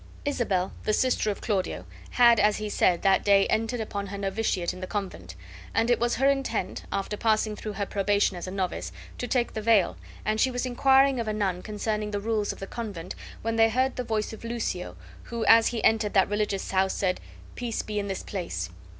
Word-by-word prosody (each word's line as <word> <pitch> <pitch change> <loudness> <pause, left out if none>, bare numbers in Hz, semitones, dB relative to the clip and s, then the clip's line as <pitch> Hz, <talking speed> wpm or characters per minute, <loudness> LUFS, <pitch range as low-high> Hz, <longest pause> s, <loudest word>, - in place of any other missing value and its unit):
Isabel, 200 -10 0
the 215 - +1
sister 255 -2 +2
of 205 - -3
Claudio, 200 -5 -2 0.2
had, 235 -2 +5
as 210 0 +3
he 215 0 -4
said, 180 -3 +2
that 195 -1 +4
day 200 -1 +5
entered 225 +2 0
upon 205 -2 -4
her 200 +1 -6
novitiate 195 -2 -1
in 185 - -9
the 185 - -5
convent, 185 - -5 0.4
and 230 +2 +3
it 240 - +3
was 240 0 +1
her 270 - +2
intent, 275 -1 -1
after 195 +1 -2
passing 215 0 +1
through 215 0 -6
her 200 0 -2
probation 200 -1 +1
as 175 +1 -6
a - - -3
novice, 185 -2 -3 0.3
to 245 - -3
take 245 -1 0
the 220 - -3
veil, 215 -4 +3 0.3
and 215 +1 0
she 265 - +4
was 245 0 -2
inquiring 265 +1 +4
of 230 - -2
a 215 - 0
nun 195 -4 -1
concerning 210 0 -2
the 205 -1 -2
rules 215 0 -1
of - - -9
the 195 - -5
convent 195 -6 -6 0.3
when 225 0 -1
they 225 0 +6
heard 255 +3 +1
the 250 - -2
voice 220 -2 -2
of 220 - -10
Lucio, 225 - -3 0.3
who, 235 -2 -3
as 225 0 +7
he 235 -2 -2
entered 215 -2 +3
that 190 -1 +4
religious 205 -2 -1
house, 190 0 +2
said, 185 -2 0 0.3
"Peace 240 -2 -3
be 210 -1 -3
in 200 - -3
this 195 -1 -4
place!" 170 - -4
210 Hz, 215 wpm, -27 LUFS, 195-230 Hz, 0.4 s, as